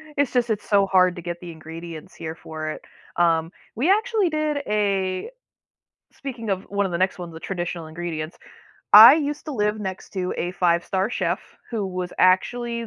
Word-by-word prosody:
It's 285 -2 +1
just 245 -2 +1
it's 215 -2 -2
so 200 -1 +3
hard 185 -2 +3
to - - -6
get 175 0 -5
the 175 -1 -8
ingredients 165 +2 -9
here 160 -1 -6
for 155 -1 -6
it. - - -6 0.4
Um, 165 -1 +2 0.2
we 285 - +2
actually 430 -3 +2
did 305 -1 -1
a 195 - 0 0.8
speaking 240 -6 -6
of 190 -1 -1
one 200 0 -1
of - - -5
the 170 - -2
next 185 +1 0
ones, 175 -2 -7
the 160 - -8
traditional 175 -2 -4
ingredients. 160 -1 -5 0.6
I 225 +6 +12
used 295 -1 -3
to 305 - -4
live 210 -3 0
next 190 -2 -6
to 185 -1 -2
a 175 - -2
5-star 185 +3 +1
chef, 180 -5 -1 0.3
who 225 -4 -2
was 180 -1 -4
actually 235 +5 +2
185 Hz, 180 wpm, -23 LUFS, 175-230 Hz, 0.8 s, I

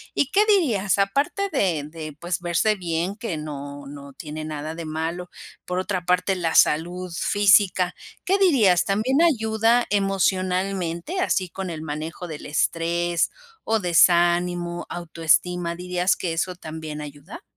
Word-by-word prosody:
¿Y 285 - +1
qué 415 +2 +4
dirías? 230 - +2
Aparte 280 - 0
de 170 -7 +1
de 155 0 -8
pues 175 +1 -2
verse 175 +5 +1
bien, 175 0 -2
que 210 -7 -4
no, 145 -2 -7
no 140 0 -10
tiene 155 +2 -7
nada 155 0 -5
de 165 -1 -7
malo. 165 +3 -4 0.4
Por 180 - -3
otra 185 -2 -2
parte, 180 +2 +2
la 165 -3 -1
salud 175 +3 +2
física, 195 -1 +3 0.3
¿qué 390 +2 +3
dirías, 230 - +4
también 225 +9 +1
ayuda 230 -5 +3
emocionalmente? 190 - 0
Así, 190 - 0
con 190 0 -5
el 160 -2 -5
manejo 160 +3 -5
del 155 -3 -8
estrés 170 +2 0 0.3
o 225 0 +1
desánimo, 175 0 +3
autoestima, 170 +1 0
¿dirías 180 +1 0
que 170 -3 -3
eso 180 +2 -2
también 155 -2 -7
ayuda? 150 - -10
180 Hz, 140 wpm, -23 LUFS, 165-195 Hz, 0.4 s, qué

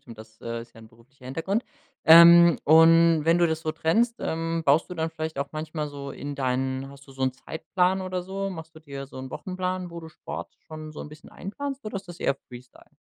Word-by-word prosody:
stimmt, 115 -2 -13
das, 110 0 -14
äh, 115 0 -5
ist 115 0 -13
ja - - -15
'n 110 - -14
beruflicher 125 +4 -22
Hintergrund. 165 - -2 0.4
Ähm, 170 0 +9
und 165 0 +6
wenn 165 +1 +4
du 170 -1 +3
das 160 0 -2
so 155 -1 -2
trennst, 225 +10 +1
ähm, 165 0 -2
baust 145 +3 +3
du 180 - -7
dann 160 -1 -2
vielleicht 160 -2 -5
auch 140 - -3
manchmal 155 -1 -4
so 140 -1 -8
in 145 -1 -7
deinen 130 0 -2
hast 140 0 -14
du - - -12
so 135 0 -6
'n 130 - +1
Zeitplan 180 +7 -1
oder 185 -1 -3
so? 195 +1 -4
Machst 160 -3 -9
du - - -9
dir 140 -3 -8
so 135 - -11
'n 130 0 -7
Wochenplan, 185 +2 -4
wo 170 - -8
du 160 -1 -9
Sport - - -8
schon 155 -1 -8
so - - -9
'n - - -8
bisschen 150 +1 -14
einplanst 275 +7 -6
oder 210 -2 -5
ist 195 - -7
das 175 -1 -11
eher 135 - +1
freestyle? 125 0 -14
160 Hz, 235 wpm, -25 LUFS, 140-175 Hz, 0.4 s, Ähm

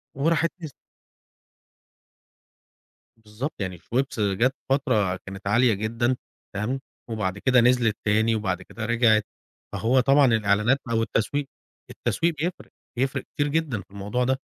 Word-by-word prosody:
وراحت 165 +4 +2
نس 155 -4 -7 2.4
بالضبط، 110 +6 -6
يعني 95 -3 -4
شويبس 130 +6 -2
جات 105 +6 +2
فترة 125 -9 +2
كانت 95 +1 -8
عالية 120 +3 +4
جدًا، 115 +5 0 0.4
تمام، 105 +7 -2 0.3
وبَعد 100 -4 -2
كده 125 +3 +4
نزلِت 120 -3 +3
تاني، 110 +2 +3
وبعد 95 -4 -2
كده 110 +4 -7
رجعِت. 110 -2 +3 0.5
فهو 125 +4 +2
طبعًا 135 +3 +5
الإعلانات 110 +1 +3
أو 115 -1 +2
التسويق، 130 +6 -1 0.4
التسويق 170 +1 0
بيفرِق، 170 +4 -4 0.3
بيفرِق 130 +1 -1
كتير 145 - +1
جدًا 145 -8 -1
في 95 - -21
الموضوع 105 +5 -2
ده. 130 +1 +1
115 Hz, 130 wpm, -25 LUFS, 105-135 Hz, 2.4 s, طبعًا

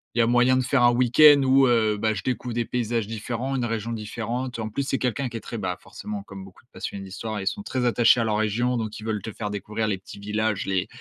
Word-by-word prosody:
il - - 0
y - - +7
a - - +2
moyen 125 +2 +4
de 130 - +1
faire 125 0 +2
un 120 - +6
week-end 135 +4 +6
où, 135 0 +5
heu, 110 -3 +2
bah, 110 0 +1
je 95 - -5
découvre 125 -2 -3
des 120 -1 0
paysages 115 -3 -1
différents, 115 +5 -4
une 125 -2 0
région 115 0 -3
différente. 115 +3 -4
En 110 -1 -4
plus, 140 +6 -2
c'est 135 - 0
quelqu'un 130 +1 -1
qui 115 - -6
est - - -5
très, 115 - -6
bah, 90 -2 -3
forcément 105 -1 -7
comme 100 -1 -10
beaucoup 95 -1 -15
de - - -39
passionnés 100 -1 -6
d'histoire, 105 +3 -5
ils 95 - -6
sont 205 - -1
très 130 -11 -2
attachés 120 0 +4
à - - +2
leur 110 -1 0
région. 120 +4 0
Donc, 110 -2 -4
ils 110 - -9
veulent 110 -2 -2
te 110 - -6
faire 105 0 -5
découvrir 105 +2 -3
les 100 -3 -1
petits 95 - -12
villages, 105 0 -1
les 95 +1 0
115 Hz, 275 wpm, -25 LUFS, 105-125 Hz, -, y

